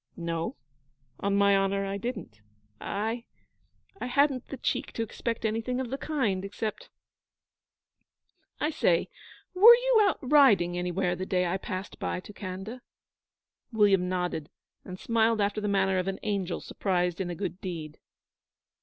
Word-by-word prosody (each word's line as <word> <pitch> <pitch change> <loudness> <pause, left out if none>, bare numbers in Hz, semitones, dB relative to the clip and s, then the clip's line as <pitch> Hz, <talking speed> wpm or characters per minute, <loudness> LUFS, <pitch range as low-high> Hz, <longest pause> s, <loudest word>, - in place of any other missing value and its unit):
'No, 170 -1 -3 0.6
on 200 0 0
my 200 0 +5
honour, 195 0 +1
I 195 0 -3
didn't. 200 - -6 0.4
I 225 +4 -3 0.8
hadn't 260 +1 +1
the 275 - -7
the - - -34
cheek - - -1
to 230 - -1
expect 230 +1 -4
anything 225 +3 -1
of 255 -2 -4
the 270 - -2
kind, 225 -12 -1
except... 215 - -5 1.7
I 300 - 0
say, - - +2 0.4
were 435 +6 +10
you - - +3
out 395 -3 +3
riding 250 - +4
anywhere 180 0 -1
the 185 +1 -5
day 180 -1 +1
I 175 +2 0
passed 185 0 -6
by - - -2
to 210 - -12
Khanda?' 200 +5 -7 0.9
William 200 -5 +3
nodded, 180 -4 -2 0.3
and 185 0 -8
smiled 230 -1 +2
after 205 +1 0
the 210 - -1
manner 195 -2 +2
of 185 - -2
an 195 0 -2
angel 195 -4 -2
surprised 180 -2 -1
in 180 - -3
a 175 - -4
good 180 0 -5
deed. 160 -5 -6
200 Hz, 150 wpm, -28 LUFS, 185-235 Hz, 1.7 s, were